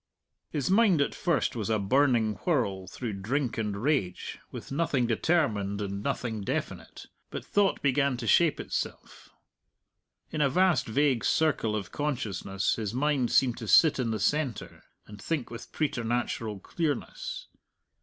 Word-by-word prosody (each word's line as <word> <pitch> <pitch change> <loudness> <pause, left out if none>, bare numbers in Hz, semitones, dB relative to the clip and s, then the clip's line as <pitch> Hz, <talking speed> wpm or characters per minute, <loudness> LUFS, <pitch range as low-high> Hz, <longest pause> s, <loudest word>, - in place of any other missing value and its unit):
His 150 +3 -1
mind 200 -5 +5
at 140 - +1
first 160 -9 0
was 110 -2 -3
a 110 - +2
burning 115 +1 +2
whirl 100 - -1
through 115 +3 -5
drink 125 +3 -1
and 105 -2 -2
rage, 115 -7 -1
with - - -9
nothing 140 -4 +1
determined 110 - +1
and 100 -1 -3
nothing 110 0 -2
definite. 95 - -4 0.2
But - - -6
thought 200 -2 +1
began 140 -1 +2
to 120 - -5
shape 165 +6 +4
itself. - - -5 1.0
In 155 - -1
a 140 - +4
vast 180 -3 +3
vague 130 +1 +2
circle 145 -9 +1
of 100 -3 -4
consciousness 110 -9 -2
his 110 0 -3
mind 140 -3 +1
seemed 125 -3 +3
to 115 - -6
sit 155 +5 +6
in 120 -3 0
the 110 -1 -2
centre 135 +2 -2 0.2
and 105 0 -12
think 155 -8 -2
with 115 - -9
preternatural 120 -6 -2
clearness. - - -3
125 Hz, 145 wpm, -28 LUFS, 110-150 Hz, 1.0 s, sit